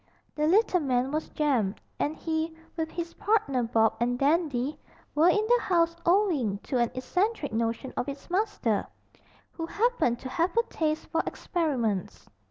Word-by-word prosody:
The 300 0 0
little 380 +1 +4
man 260 -3 0
was 310 +1 -2
Jem; 245 -10 +1 0.2
and 300 +2 0
he, 320 0 -2 0.2
with 320 -1 -2
his 335 0 -5
partner 400 - +1
Bob, 225 -1 +2
and 245 +1 +1
Dandy, 290 -1 +1 0.3
were 320 +4 +5
in 420 +4 +2
the 485 +2 +4
house 335 -3 +2
owing 340 - +3
to 255 - -1
an 235 -1 +2
eccentric 360 - -1
notion 230 +3 -1
of 265 - -2
its 280 0 -8
master, 360 - 0 0.6
who 330 -1 -5
happened 430 - +1
to 260 - -6
have 340 - 0
a 465 - +5
taste 310 -1 0
for 325 - +2
experiments. 245 - -2
305 Hz, 160 wpm, -28 LUFS, 245-350 Hz, 0.6 s, were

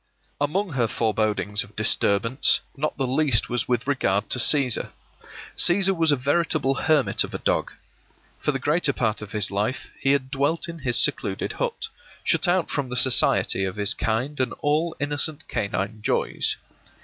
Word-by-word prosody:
Among 180 +7 -1
her 125 -4 0
forebodings 105 -2 0
of 100 +2 -18
disturbance, 110 +3 +2 0.2
not 155 +2 -3
the 135 - -1
least 130 -2 +1
was 120 -2 -2
with 125 -1 -1
regard 105 -7 0
to 130 - +2
Cæsar. 130 -1 +3 0.7
Cæsar 190 +2 +3
was 165 -2 +2
a - - +4
veritable 145 +1 0
hermit 150 0 +2
of - - -7
a - - -1
dog. - - -1 0.7
For - - 0
the - - -2
greater - - +1
part 110 -1 -1
of 105 -1 -9
his 105 -2 0
life 105 +6 -3
he 135 - +2
had 130 -2 -2
dwelt 145 +4 -1
in 170 -1 -8
his 125 -4 -1
secluded - - +1
hut, 470 -2 -4 0.3
shut - - +2
out 175 -1 +1
from 140 -3 -2
the 125 - -5
society 125 -5 +4
of 95 -1 -3
his 105 -1 +1
kind 125 +6 -2
and 130 -2 -1
all 155 +3 0
innocent 145 +2 -2
canine 100 +2 -3
joys. - - -1
130 Hz, 170 wpm, -24 LUFS, 110-150 Hz, 0.7 s, a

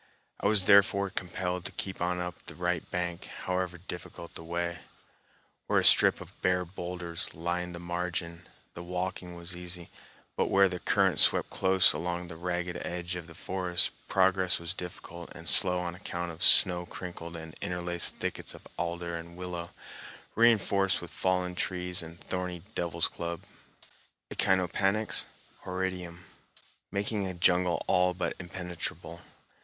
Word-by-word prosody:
I - - +1
was 100 -3 +4
therefore 100 0 +5
compelled 90 0 -2
to - - -2
keep 95 -2 -5
on 90 0 0
up 90 0 -6
the 85 - -7
right 90 0 -2
bank, 90 -1 -3 0.2
however 90 -1 -1
difficult 85 -1 -8
the - - -9
way. 85 +1 -3 0.9
Where - - +2
a - - +4
strip - - +6
of - - -13
bare 90 0 +2
boulders 85 -1 -5
lined 85 +1 -3
the - - -7
margin, 85 -1 -3 0.3
the 85 - -8
walking 90 0 -4
was 85 +1 -7
easy, 90 -1 -7 0.4
but - - +1
where 100 0 +5
the 90 -1 -4
current - - +2
swept - - +4
close 95 0 +5
along 90 0 -3
the 85 - -8
ragged 90 +1 -3
edge 90 0 -4
of 85 -2 -7
the 85 - -13
forest, 90 0 0 0.2
progress 95 -1 +3
was 85 +1 -5
difficult 85 -1 -8
and 80 - -7
slow 90 +4 +7
on 90 -1 -3
account 85 -1 -5
of 80 +1 -12
snow 90 -2 +7
crinkled 85 -2 -7
and 80 -1 -8
interlaced 90 -1 0
thickets - - -4
of - - -14
alder 85 0 -3
and 85 +1 -8
willow, 90 -1 -5 0.6
reinforced 100 -4 +4
with - - -9
fallen 90 -1 0
trees 90 0 -1
and 85 0 -10
thorny 90 -2 -3
devil's 85 -3 0
club 85 0 -5 0.9
(Echinopanax 95 +3 +2 0.4
horridum), 90 -2 -4 0.7
making 100 0 -1
a 95 - -5
jungle 90 0 +3
all 90 0 +3
but 90 - -2
impenetrable. 90 -1 -5
90 Hz, 150 wpm, -29 LUFS, 85-90 Hz, 0.9 s, slow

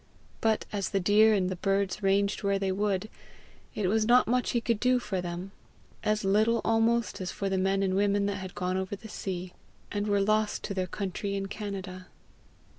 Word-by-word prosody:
But 220 -1 +1
as 200 -2 -1
the 195 - 0
deer 210 +3 +5
and 185 -2 +1
the 185 - -2
birds 195 +1 0
ranged 200 +1 +2
where 200 -1 +1
they 195 -1 -1
would, 200 0 0 0.7
it 210 - -1
was 215 +3 +2
not 245 +1 +5
much 250 +2 +1
he 240 - +1
could 230 -2 0
do 250 +2 +3
for 200 -6 -2
them 175 +2 -5 0.5
as 215 0 +1
little 215 +4 +3
almost 225 -2 +1
as 185 - -3
for 195 - -3
the 190 - 0
men 195 +1 +1
and 190 -1 +1
women 200 +1 +2
that 200 0 -1
had 185 -1 -7
gone 180 +1 -1
over 190 +1 -3
the 210 +3 -11
sea, 185 -3 -5 0.4
and 205 0 -2
were 205 -1 +2
lost 215 +1 +1
to - - -3
their 185 -1 -1
country 200 +1 -3
in 195 0 -2
Canada. 195 -3 -6
200 Hz, 200 wpm, -29 LUFS, 190-215 Hz, 0.7 s, deer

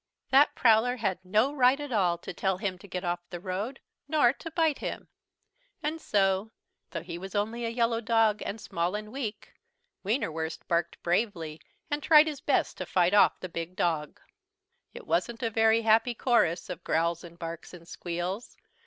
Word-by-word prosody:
That 275 +3 +5
Prowler 235 +1 +4
had 190 -6 -2
no 215 +9 +2
right 260 0 +4
at 290 -2 -6
all 180 -6 +2
to 170 - -8
tell 190 +1 0
him 190 -2 -3
to 200 - -13
get 185 -1 -4
off 175 0 -1
the 175 - -6
road 200 +8 -4 0.3
nor 285 -5 +4
to 330 - -8
bite 320 -3 +1
him! - - -5 0.7
And 315 +2 -2
so, 195 0 +1 0.4
though 165 -2 -5
he 170 0 -6
was 190 +3 -8
only 225 +3 -1
a - - -1
yellow 230 0 0
dog 225 -2 +2
and 210 - -5
small 180 -3 -2
and 210 0 -6
weak, 235 -5 -5 0.5
Wienerwurst 165 - -2
barked 170 0 -1
bravely 170 -4 -1 0.3
and 290 0 0
tried 305 0 +7
his 300 -3 -5
best - - +1
to - - -4
fight 180 +1 +2
off 205 - +5
the 185 - -5
big 170 +1 -6
dog. 165 -6 -1 0.7
It - - -11
wasn't 230 +7 -1
a 230 - 0
very 225 +1 +3
happy 225 +2 +3
chorus 200 -9 +2
of 180 -1 -7
growls 170 +2 0
and 170 -1 -12
barks 165 -1 -7
and 170 -2 -13
squeals. 175 +6 -5
205 Hz, 180 wpm, -28 LUFS, 175-235 Hz, 0.7 s, tried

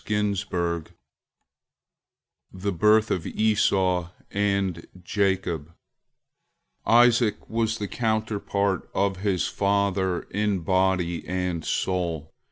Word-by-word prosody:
VI 105 -1 +1
JACOB 85 -4 -2 1.6
THE 95 +2 -3
BIRTH 105 +5 +3
OF 90 - 0
ESAU 95 -5 +1 0.2
AND 100 -4 -1
JACOB 90 -4 -1 1.1
Isaac 115 -2 +4
was 115 0 0
the 105 - -3
counterpart 105 -4 -1
of 100 -1 +1
his 95 -2 0
father 100 -2 0
in 105 -2 0
body 90 -1 +1
and 90 -3 -2
soul. 85 -5 -2
95 Hz, 90 wpm, -25 LUFS, 90-105 Hz, 1.6 s, Isaac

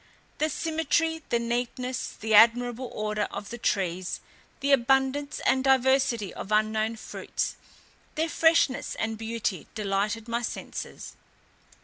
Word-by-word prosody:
The 310 - +2
symmetry, 320 +1 0
the 235 - +3
neatness, 245 +2 -2
the 220 0 -1
admirable 240 +3 +5
order 210 -1 -1
of 205 - -7
the 240 - -6
trees, 185 -3 -1 0.4
the 280 +1 0
abundance 270 +2 +2
and 260 - +3
diversity 265 -5 +3
of 210 - -7
unknown 215 +1 +1
fruits, 220 - -4 0.6
their 320 +1 +1
freshness 325 -5 +2
and 225 0 -2
beauty, 220 -5 -3
delighted 210 +2 -1
my 235 +1 -1
senses. 230 - -6
235 Hz, 120 wpm, -27 LUFS, 215-270 Hz, 0.6 s, admirable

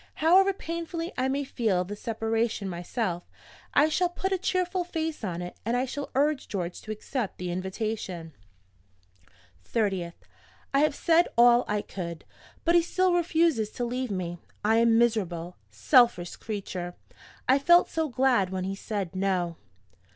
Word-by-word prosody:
However 370 +5 +5
painfully 335 -1 -5
I 255 +1 0
may 275 +2 0
feel 220 -9 0
the 200 +3 -6
separation 225 -1 -1
myself, 175 0 -3 0.5
I 295 - +6
shall 355 +3 +1
put 380 +2 -3
a 380 - +1
cheerful 365 0 0
face 320 -5 -4
on 180 -3 -3
it; 175 - -7
and 230 +3 0
I 255 - +1
shall 280 +2 -5
urge 290 0 +1
George 180 -3 -4
to 215 - -7
accept 215 +1 -4
the 180 -1 -4
invitation. 185 -3 -4 1.3
"30th. 190 - -1 0.6
I 275 - +4
have 300 0 +3
said 340 +1 +3
all 240 +1 +6
I 210 0 -1
could; 170 -4 -6 0.4
but 340 - +4
he 345 - +6
still 370 +2 +1
refuses 330 -9 +2
to 245 - -2
leave 250 +1 -2
me. 175 -3 -3 0.3
I 220 +1 +4
am 230 0 +4
a - - +5
miserable, 185 -7 0
selfish 240 - +3
creature. 185 -4 -5 0.5
I 265 +2 +5
felt 345 +5 +6
so 320 -1 -1
glad 250 -7 +2
when 185 0 -3
he 190 +1 -2
said 195 -2 -4
No. 185 -3 0
230 Hz, 160 wpm, -27 LUFS, 185-305 Hz, 1.3 s, I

